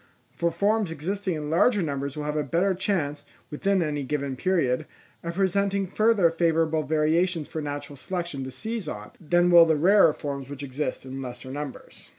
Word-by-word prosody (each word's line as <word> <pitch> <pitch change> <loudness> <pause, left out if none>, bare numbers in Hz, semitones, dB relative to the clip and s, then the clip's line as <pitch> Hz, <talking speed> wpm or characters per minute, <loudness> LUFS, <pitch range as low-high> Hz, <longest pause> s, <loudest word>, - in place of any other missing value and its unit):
For 170 - +1
forms 200 +4 +1
existing 180 +4 -2
in 150 -1 -4
larger 200 +4 +3
numbers 140 -1 -3
will 150 - -3
have 150 0 -2
a 150 - +1
better 175 +7 +1
chance, 165 -7 -2 0.3
within 190 +4 +1
any 150 -2 -2
given 140 0 -2
period, 155 -3 0 0.3
of 170 0 -5
presenting 195 +1 +1
further 200 -2 +3
favourable 165 -1 +1
variations 155 +3 +1
for 160 - -5
natural 145 -1 -6
selection 170 -3 -4
to - - -5
seize 220 - -5
on, - - -7
than 175 +2 +3
will 170 -1 +8
the 160 - +3
rarer 180 +2 +5
forms 140 -2 -5
which 145 0 -7
exist 135 0 -4
in 135 +1 -6
lesser 125 0 -7
numbers. 145 -1 -8
160 Hz, 175 wpm, -26 LUFS, 145-185 Hz, 0.3 s, will